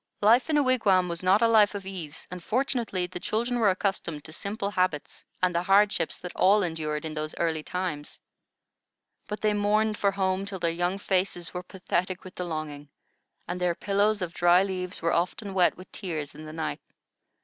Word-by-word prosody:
Life 235 Hz, +7 st, +5 dB
in 305 Hz, -, +3 dB
a 290 Hz, -, +4 dB
wigwam 205 Hz, -8 st, +3 dB
was 170 Hz, -1 st, -4 dB
not 190 Hz, +5 st, +4 dB
a -, -, +6 dB
life 215 Hz, -2 st, +5 dB
of 200 Hz, -1 st, -5 dB
ease, 180 Hz, -6 st, -7 dB
and 180 Hz, -1 st, -7 dB
fortunately 235 Hz, -6 st, 0 dB
the 180 Hz, 0 st, -7 dB
children 240 Hz, +6 st, -1 dB
were 215 Hz, -3 st, +5 dB
accustomed 185 Hz, -5 st, -1 dB
to -, -, -8 dB
simple 200 Hz, +4 st, -3 dB
habits 185 Hz, -6 st, -1 dB, 0.2 s
and 180 Hz, -1 st, +3 dB
the 170 Hz, -, +1 dB
hardships 195 Hz, -2 st, +3 dB
that 180 Hz, -, -8 dB
all 200 Hz, +2 st, +5 dB
endured 155 Hz, -3 st, -3 dB
in 155 Hz, -, -4 dB
those 155 Hz, 0 st, -4 dB
early 160 Hz, -2 st, 0 dB
times. 165 Hz, -3 st, -4 dB, 1.1 s
But 210 Hz, -, -5 dB
they 215 Hz, -1 st, +2 dB
mourned 210 Hz, +1 st, +1 dB
for 200 Hz, -, +3 dB
home 190 Hz, -1 st, 0 dB
till 200 Hz, -1 st, -5 dB
their 170 Hz, -2 st, 0 dB
young 175 Hz, +3 st, 0 dB
faces 185 Hz, -3 st, -1 dB
were 180 Hz, -, -3 dB
pathetic 185 Hz, 0 st, -2 dB
with 185 Hz, -, -10 dB
the 180 Hz, -, -4 dB
longing, 150 Hz, -3 st, -5 dB, 0.6 s
and 180 Hz, +1 st, -4 dB
their 175 Hz, -1 st, +1 dB
pillows 205 Hz, +1 st, +1 dB
of 170 Hz, -1 st, -5 dB
dry 175 Hz, +2 st, +5 dB
leaves 185 Hz, -2 st, -4 dB
were 165 Hz, -, +2 dB
often 190 Hz, +4 st, -1 dB
wet 180 Hz, -2 st, +3 dB
with 185 Hz, +1 st, -13 dB
tears 155 Hz, -6 st, -4 dB
in 155 Hz, -, -10 dB
the 155 Hz, -, -8 dB
night. 160 Hz, 0 st, -3 dB
185 Hz, 195 wpm, -27 LUFS, 170-205 Hz, 1.1 s, a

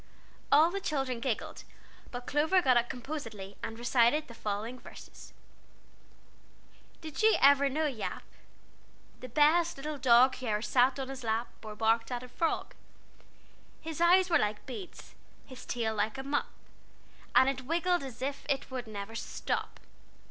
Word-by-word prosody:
All 310 Hz, +4 st, +6 dB
the 395 Hz, +1 st, -3 dB
children 270 Hz, -7 st, -2 dB
giggled, 230 Hz, -2 st, -3 dB, 0.5 s
but 245 Hz, -1 st, -7 dB
Clover 315 Hz, +6 st, +2 dB
got 260 Hz, -8 st, +3 dB
up 240 Hz, 0 st, +2 dB
composedly, 225 Hz, -7 st, -6 dB
and 225 Hz, -, -5 dB
recited 240 Hz, +5 st, +2 dB
the 235 Hz, -, -11 dB
following 220 Hz, +3 st, -4 dB
verses: -, -, -13 dB, 1.7 s
"Did 315 Hz, +2 st, -6 dB
you 440 Hz, 0 st, +5 dB
ever 280 Hz, 0 st, +5 dB
know 310 Hz, +4 st, -1 dB
Yap? 265 Hz, -7 st, -4 dB, 1.0 s
The 255 Hz, -, -9 dB
best 320 Hz, +3 st, +3 dB
little 295 Hz, +1 st, -5 dB
dog 255 Hz, 0 st, +5 dB
Who 255 Hz, -, -6 dB
e'er 210 Hz, -1 st, +1 dB
sat 255 Hz, +2 st, +3 dB
on 270 Hz, 0 st, -5 dB
lap 230 Hz, 0 st, -1 dB
Or 215 Hz, -1 st, -8 dB
barked 225 Hz, +2 st, +1 dB
at 245 Hz, 0 st, -3 dB
a -, -, -9 dB
frog. 325 Hz, +6 st, -2 dB, 1.1 s
"His 320 Hz, 0 st, -6 dB
eyes 360 Hz, +2 st, +5 dB
were 335 Hz, -, +5 dB
like 210 Hz, 0 st, -2 dB
beads, 355 Hz, +7 st, -9 dB, 0.3 s
His 260 Hz, -2 st, -12 dB
tail 225 Hz, -2 st, -1 dB
like 215 Hz, +4 st, -1 dB
a 265 Hz, -, -5 dB
mop, 285 Hz, +1 st, -1 dB, 0.9 s
And 260 Hz, -, +7 dB
it 260 Hz, -2 st, -2 dB
waggled 345 Hz, +2 st, +1 dB
as 260 Hz, -2 st, -8 dB
if 275 Hz, +1 st, -3 dB
It 275 Hz, -1 st, -1 dB, 0.2 s
never 200 Hz, -1 st, -6 dB
would 225 Hz, -, -6 dB
stop. -, -, -4 dB
260 Hz, 155 wpm, -30 LUFS, 230-300 Hz, 1.7 s, And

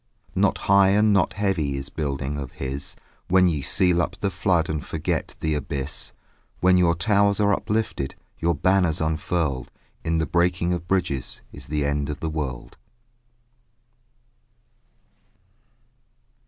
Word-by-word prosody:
Not -, -, +2 dB
high 100 Hz, 0 st, +6 dB
and 105 Hz, 0 st, +4 dB
not 95 Hz, -2 st, +2 dB
heavy 90 Hz, -9 st, 0 dB
Is 70 Hz, +1 st, -6 dB
building 70 Hz, -2 st, -3 dB
of 70 Hz, -3 st, -6 dB
his: 70 Hz, +1 st, -5 dB, 0.3 s
When 95 Hz, 0 st, +5 dB
ye 80 Hz, -5 st, +1 dB
seal 90 Hz, +4 st, +3 dB
up 90 Hz, -, -2 dB
the 100 Hz, -, -1 dB
flood 90 Hz, -2 st, +1 dB
And 80 Hz, -2 st, -3 dB
forget -, -, -3 dB
the 80 Hz, -1 st, 0 dB
abyss, 70 Hz, -3 st, -3 dB, 0.5 s
When 90 Hz, 0 st, +5 dB
your 85 Hz, -2 st, +4 dB
towers 100 Hz, +3 st, +2 dB
are 105 Hz, 0 st, +4 dB
uplifted, 105 Hz, -11 st, -2 dB, 0.2 s
Your 85 Hz, 0 st, +1 dB
banners 90 Hz, 0 st, +2 dB
unfurled, 80 Hz, -3 st, -1 dB, 0.3 s
In 80 Hz, 0 st, 0 dB
the 80 Hz, -, +1 dB
breaking 85 Hz, +1 st, +1 dB
of 85 Hz, -1 st, -4 dB
bridges 85 Hz, -9 st, -1 dB
Is -, -, -9 dB
the 75 Hz, 0 st, -1 dB
end 70 Hz, 0 st, -1 dB
of 75 Hz, -, -4 dB
the 80 Hz, -, -3 dB
world. 70 Hz, -6 st, -5 dB
80 Hz, 140 wpm, -24 LUFS, 70-95 Hz, 0.5 s, high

